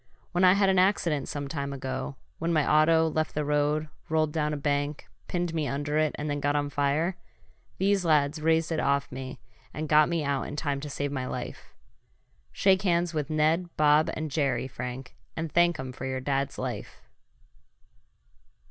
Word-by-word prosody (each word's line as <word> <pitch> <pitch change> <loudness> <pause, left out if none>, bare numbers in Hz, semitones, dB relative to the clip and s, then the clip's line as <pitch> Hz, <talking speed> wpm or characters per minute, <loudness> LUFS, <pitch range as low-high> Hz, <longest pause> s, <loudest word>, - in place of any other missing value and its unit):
When 180 +1 +1
I 185 0 +8
had 200 0 +3
an 190 -1 +4
accident 175 -7 +2
some 145 -1 -4
time 140 -1 -3
ago 130 +1 -4 0.2
when 165 +1 -1
my 155 -3 +2
auto 160 +1 +4
left 155 0 -1
the 150 0 -1
road, 150 +1 +1 0.2
rolled 155 -1 +1
down 150 -2 0
a 150 - -2
bank, 145 0 -1 0.2
pinned 175 -2 -2
me 155 -3 -1
under 145 +2 -1
it 155 -1 +1
and 150 - -3
then 145 -1 -1
got 145 0 0
on 145 -1 0
fire 145 +6 0 0.6
these 195 0 +2
lads 155 -2 +2
raised 160 +1 +2
it 160 - 0
off 140 -1 +1
me 130 0 -7 0.4
and 155 +1 -3
got 150 +1 +5
me 170 -2 0
out 140 -1 -1
in - - -6
time 145 -2 -1
to 150 +1 -6
save 145 0 -3
my 130 -2 -3
life. - - -7 0.8
Shake 190 -1 +3
hands 175 -3 +1
with 150 -3 -2
Ned, 160 +3 +1
Bob 150 +1 +4
and 155 -1 -4
Jerry, 135 -4 0
Frank, 125 0 -7 0.2
and 160 -1 -3
thank 175 -1 +3
'em 130 -1 -5
for 130 +1 -6
your 130 0 -2
dad's 140 +1 -1
life." 125 -5 -5
150 Hz, 185 wpm, -28 LUFS, 140-160 Hz, 0.8 s, I